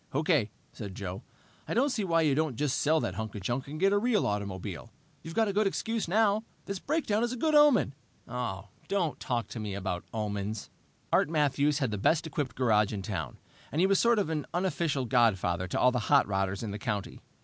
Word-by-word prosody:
"Okay," 150 - +2 0.2
said 100 -4 -7
Joe. 95 -1 -5 0.5
"I - - -2
don't 270 +4 +3
see 220 - -1
why 165 -3 +2
you 150 -3 +3
don't 155 -2 0
just 140 0 0
sell 155 +2 +3
that 95 - -2
hunk 110 +3 -5
of 105 - -5
junk 120 +7 -2
and 150 +2 -6
get 195 +2 +4
a 205 - +4
real 230 -1 +2
automobile. 100 -6 -4 0.3
You've 165 +1 -8
got 225 -1 +3
a 200 - -1
good 210 +1 +3
excuse 225 +2 -2
now. 210 +3 +3 0.2
This 200 -1 -4
breakdown 275 - 0
is 240 - 0
a - - -5
good 310 +5 +1
omen!" 295 - +5 0.3
"Don't 125 - -3
talk 120 -2 -2
to 115 - -6
me 105 -2 -4
about 95 -3 -3
omens!" 105 -1 -3 0.4
Art - - +4
Matthews 145 -2 +2
had 135 -6 0
the 105 - -3
best 160 +11 +2
equipped 140 -6 -3
garage 110 -5 +3
in 100 -3 -4
town, 85 - -4 0.3
and 150 - -1
was 195 -1 +3
a - - +4
sort 235 -1 +4
of 195 -6 0 0.2
unofficial 165 -6 0
godfather 100 -8 +2
to - - -2
all 125 - +5
the 125 - 0
hot 145 -1 +6
rodders 95 +1 -1
in 110 - -3
the 105 - -5
county. 105 -2 -4
135 Hz, 215 wpm, -29 LUFS, -, 0.5 s, hot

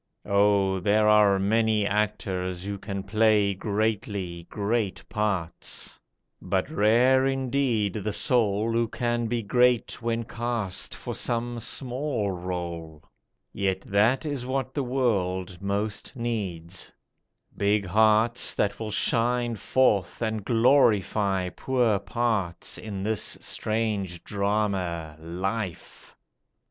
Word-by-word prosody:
Oh 100 -1 +3
there 105 +3 +3
are 105 -2 +5
many 110 +1 +2
actors 95 -3 -1
who 100 0 -4
can 100 -1 -5
play 105 0 +3
Greatly, 100 -4 -2
great 105 -1 -2
parts; 100 -6 -3 0.4
but - - -1
rare 125 +6 +4
indeed 130 -6 0
the 105 0 -3
soul 110 -1 +1
Who 115 0 +1
can 120 0 -1
be 115 0 -1
great 120 +3 +2
when 115 0 -1
cast 115 -5 -3
for - - -6
some 120 0 -2
small 125 -3 -1
rôle; 85 -3 -5 0.5
Yet 95 -1 -1
that 110 +10 +2
is 145 -4 -3
what 130 0 -2
the 145 - -1
world 95 -8 -1
most 100 +4 -3
needs; 95 -8 -4 0.6
big 100 0 +1
hearts 110 +4 +3
That 105 - 0
will 110 -1 -4
shine 120 +2 +1
forth 105 -6 +1
and 110 -2 -2
glorify 105 -6 +3
poor 120 -1 +1
parts 100 -4 -2
In 100 -3 -5
this 110 -1 -1
strange 105 -6 -2
drama, 100 -6 -1
Life! 95 +4 -5
105 Hz, 110 wpm, -26 LUFS, 95-115 Hz, 0.6 s, are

